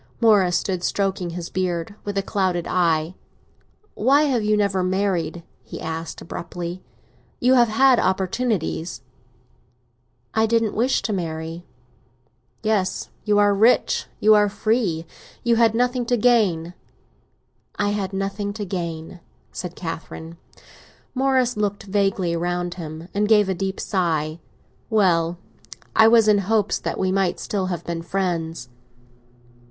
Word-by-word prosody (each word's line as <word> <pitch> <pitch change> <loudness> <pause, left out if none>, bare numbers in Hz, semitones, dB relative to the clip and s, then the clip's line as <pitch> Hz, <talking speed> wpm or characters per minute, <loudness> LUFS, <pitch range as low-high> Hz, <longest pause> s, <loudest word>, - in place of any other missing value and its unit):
Morris 200 -6 +4
stood 180 -1 -2
stroking 195 -2 -1
his 170 0 -6
beard, 180 0 -2
with 205 -1 -4
a 195 - +1
clouded 185 -4 -1
eye. 165 -2 +1 0.8
"Why 275 +7 +3
have 255 -7 +1
you 210 0 +2
never 200 -2 +1
married?" 180 -3 -1 0.2
he - - -9
asked 160 0 -5
abruptly. 175 +1 -6 0.6
"You 250 +1 +4
have 240 -2 +5
had 255 +3 +4
opportunities." 190 - -1 1.3
"I 220 0 +3
didn't 225 -1 +1
wish 250 +4 +1
to 215 - -1
marry." 165 -1 -4 1.0
"Yes, 215 -4 0
you 210 -1 +3
are 205 0 +4
rich, 220 +5 +3
you 215 +1 +6
are 210 -1 +4
free; 200 -7 0 0.4
you 235 -1 +3
had 225 -1 +4
nothing 245 0 0
to 245 - +2
gain." 205 -8 +2 1.0
"I 205 - 0
had 200 -2 -2
nothing 200 +1 -3
to 210 -1 -5
gain," 170 -2 -5 0.3
said 180 -1 -6
Catherine. 165 -1 -7 0.8
Morris 260 -2 +2
looked 205 -1 -2
vaguely 195 -3 0
round 175 +1 -2
him, 160 -1 -8
and 210 +1 +1
gave 210 -3 +5
a - - +2
deep 190 +1 -3
sigh. 160 -4 -1 0.5
"Well, 175 -6 +2 0.6
I 220 - +7
was 225 -1 +5
in 210 -1 +5
hopes 210 +1 +1
that - - -3
we 185 -1 0
might 190 -2 0
still 195 -3 -2
have 175 -2 -4
been 170 -1 -3
friends." 165 -5 -2
195 Hz, 135 wpm, -22 LUFS, 175-215 Hz, 1.3 s, I